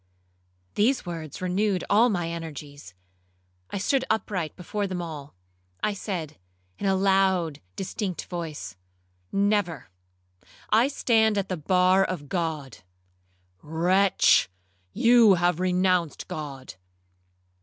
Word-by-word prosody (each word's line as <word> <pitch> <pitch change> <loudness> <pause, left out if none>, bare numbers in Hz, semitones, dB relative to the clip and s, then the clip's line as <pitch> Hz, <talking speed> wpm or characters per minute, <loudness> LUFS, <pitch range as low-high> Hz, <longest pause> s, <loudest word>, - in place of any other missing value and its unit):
Those 245 +4 +1
words 165 -1 -6
renewed 185 +1 0
all 225 +4 +4
my 175 -6 -1
energies. 145 - -8 0.7
I - - -4
stood 260 +7 +1
upright 195 -7 -1
before 200 +3 -3
them 185 -2 -4
all. 150 - -7 0.5
I 210 - +1
said, 175 -7 -5 0.4
in 200 - -1
a 195 - +3
loud 190 -5 +2
distinct 190 -1 -4
voice, 155 - -6 0.6
'Never—I 140 - -2
stand 220 -6 +2
at 200 -1 -1
the 185 - -2
bar 185 +4 +3
of 170 -7 -4
God.' 160 -7 -3 0.8
'Wretch! 180 - +3 0.4
you 230 - +6
have 175 -1 +1
renounced 180 -2 +1
God.' 140 -4 -7
180 Hz, 105 wpm, -26 LUFS, 155-200 Hz, 0.8 s, you